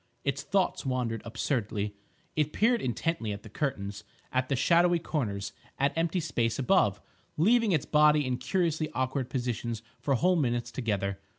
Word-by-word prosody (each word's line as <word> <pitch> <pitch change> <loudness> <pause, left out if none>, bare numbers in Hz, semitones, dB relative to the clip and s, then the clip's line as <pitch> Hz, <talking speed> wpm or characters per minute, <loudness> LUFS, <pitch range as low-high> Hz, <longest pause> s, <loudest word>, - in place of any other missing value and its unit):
Its 140 0 -1
thoughts 190 +4 0
wandered 125 -4 -1
absurdly. 110 -3 -2 0.4
It 150 -1 0
peered 235 +1 +3
intently 125 -2 -1
at 100 0 -6
the 110 - -12
curtains; 105 -8 -3 0.3
at 130 0 0
the 140 - +2
shadowy 175 +6 +4
corners; 110 -12 -3 0.2
at 140 +1 +1
empty 165 +2 +1
space 120 -8 0
above; 130 - +3 0.4
leaving 225 +6 +4
its 155 -6 +1
body 150 -1 +4
in 125 -1 -1
curiously 165 -3 0
awkward 130 0 -1
positions 120 -3 -3 0.2
for 140 - +1
whole 180 +7 +3
minutes 120 -5 0
together. 100 -5 -2
135 Hz, 155 wpm, -29 LUFS, 115-160 Hz, 0.4 s, shadowy